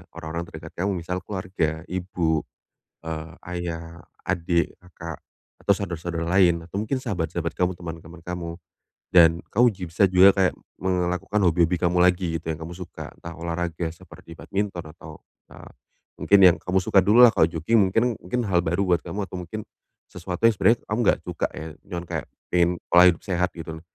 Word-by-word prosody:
Orang-orang 80 +2 -5
terdekat 80 +1 -10
kamu 100 - +1
misal, 90 +2 -4
keluarga, 90 -5 -2
ibu, 90 -4 -1 0.6
eee, 80 0 -5 0.2
ayah, 85 -1 -5 0.3
adik, 85 -1 0
kakak, 85 -2 -9 0.4
atau 100 - +4
saudara-saudara 85 -3 -4 0.2
lain, 85 -3 +4
atau 90 - -8
mungkin 110 +5 -1
sahabat-sahabat 85 - -2
kamu, 90 0 +1
teman-teman 85 -1 -9
kamu. 90 -1 -5 0.6
Dan 85 -2 +6
kamu 120 +4 +5
ji 95 -3 -9
bisa 90 +5 +3
juga 95 +1 +7
kayak 95 -2 +2 0.3
me 95 - -1 0.2
ngelakukan 90 +4 -1
hobi-hobi 85 +1 +3
kamu 90 0 +1
lagi, 90 -2 +2
gitu, 80 +1 -4
yang 80 - -5
kamu 80 +2 -7
suka. 90 0 -9
Entah 85 - -9
olahraga 85 0 -3
seperti 85 0 -14
badminton 95 -6 -4
atau, 75 -2 -12 0.3
eee, - - -12 0.5
mungkin 100 - +5
yang 90 -2 +7
kamu 95 +1 0
suka 95 - +4
dulu 110 +6 +6
lah. 120 - +9
Kalau 80 - +3
jogging 85 +8 +1
mungkin 115 +4 +1
mungkin 120 +8 -2
hal 90 -2 +3
baru 85 +4 +1
buat 85 -2 +2
kamu, 105 +1 -3
atau 90 - -6
mungkin 90 +5 -6 0.5
sesuatu 90 +3 -3
yang 115 - +4
sebenarnya 115 +3 +3
kamu 105 +3 -1
nggak - - +4
cuka 90 -2 -2
ya. 80 - -6 0.2
Cuman 85 -3 -5
kayak - - -4 0.3
pingin 85 -1 +4 0.2
pola 90 +1 +8
hidup 85 -2 +2
sehat, 90 -1 0
gitu 80 -1 -7
lho. - - -18
85 Hz, 180 wpm, -24 LUFS, 85-95 Hz, 0.6 s, lah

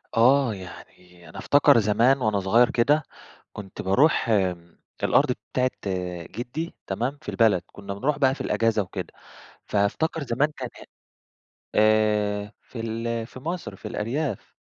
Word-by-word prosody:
آه، 125 +1 +4
يعني 90 -2 -13
أنا - - -12
أفتكر 145 -4 +5
زمان 115 +6 +3
وأنا 110 -3 +1
صغير 115 +6 +4
كده 145 +6 +2 0.5
كنت 100 -2 -8
بارُوح 120 +8 +3
آمم، 90 -5 -1 0.2
الأرض - - +3 0.2
بتاعة 130 0 +2 0.6
جِدي 140 +8 -5
تمام؟ 120 +9 -2
في - - -7
البلد 110 -6 +3
كنا 100 -1 -7
بنرُوح 135 +9 -1
بقى 135 -2 +3
في - - -8
الأجازة 115 -2 +1
وكده، 95 - -6 0.5
فأفتكر 125 +10 0
زمان 140 +4 0
كان 125 -2 -5
ه - - -11 0.9
آآ، 105 -1 +2
في 120 - -10
ال 115 0 -3
في 130 - -11
مَصر 170 +6 -5
في - - -9
الأرياف، 120 +1 -3
115 Hz, 140 wpm, -25 LUFS, 100-130 Hz, 0.9 s, أفتكر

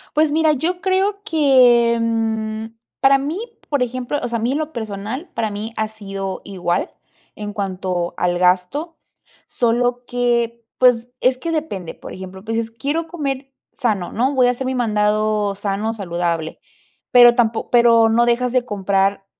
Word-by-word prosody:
Pues 305 0 +3
mira, 315 0 +3
yo 345 +6 -1
creo 390 +2 0
que, 250 - +4
mm, 220 -1 -1 0.3
para 275 0 +5
mí, 295 +7 -3 0.3
por 285 -3 0
ejemplo, 255 +3 -2
o - - -2
sea, 235 -1 -2
a - - -5
mí 240 - 0
en 285 - 0
lo 310 0 -3
personal, 220 - -5
para 220 -2 -1
mí 215 +3 -6
ha 220 0 -1
sido 195 -3 -6
igual 180 -2 -2 0.4
en 210 -1 -6
cuanto 185 -4 -3
al 175 0 +1
gasto, 185 - +1 0.5
solo 245 +1 0
que, 235 -1 0
pues, 245 -1 +3
es 255 0 +2
que 335 +6 -3
depende, 250 - -4
por - - -10
ejemplo, 190 +1 -9
pues, 225 0 -2
dices, 225 0 -1
quiero 310 +7 -2
comer 275 -5 -4 0.2
sano, 210 -9 -1
¿no? 260 +5 0
Voy 255 -1 +4
a - - +4
hacer 255 +1 -4
mi 260 - -1
mandado 210 -3 +1
sano, 205 +2 -2
saludable, 170 -4 -3 0.5
pero 240 -1 +8
tampo 230 -2 0
pero 235 -2 +6
no 235 +2 +3
dejas 240 +1 +1
de 250 -1 +1
comprar 195 -2 0
235 Hz, 165 wpm, -20 LUFS, 205-260 Hz, 0.5 s, pero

